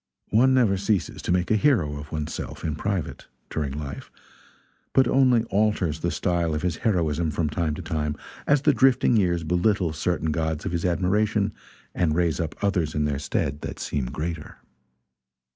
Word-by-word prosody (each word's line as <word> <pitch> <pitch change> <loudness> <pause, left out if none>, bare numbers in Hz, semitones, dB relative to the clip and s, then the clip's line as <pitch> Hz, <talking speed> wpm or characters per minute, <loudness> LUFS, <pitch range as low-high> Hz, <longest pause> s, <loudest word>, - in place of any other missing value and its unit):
One 130 +5 +5
never 110 -7 +3
ceases 100 -1 -1
to - - -2
make 90 +2 +1
a - - +5
hero 105 - +2
of 75 - -10
one's 75 0 -3
self, - - -6
(in 80 -3 -1
private,) 100 0 -3 0.2
during 75 -4 -2
life, 75 -2 -6 0.8
but 130 -2 +5
only 125 -4 +4
alters 100 -6 +1
the 85 - -1
style 85 -3 0
of 75 - -3
his 90 -3 -1
heroism 85 -6 0
from 75 0 -1
time 80 -2 -1
to 90 - -7
time 75 -2 -2 0.3
as 145 -1 +3
the 150 - +5
drifting 130 -2 +4
years 85 -5 +2
belittle 90 0 +1
certain 80 0 -1
gods 80 0 -2
of - - -2
his 85 0 -2
admiration 100 +4 +1 0.4
and 80 -4 +1
raise 85 -2 +1
up 80 -2 -3
others 85 -6 0
in 75 -1 +1
their 70 -2 -1
stead 75 0 -2
that - - -6
seem 70 -4 -2
greater. 75 +3 -5
85 Hz, 175 wpm, -25 LUFS, 75-105 Hz, 0.8 s, One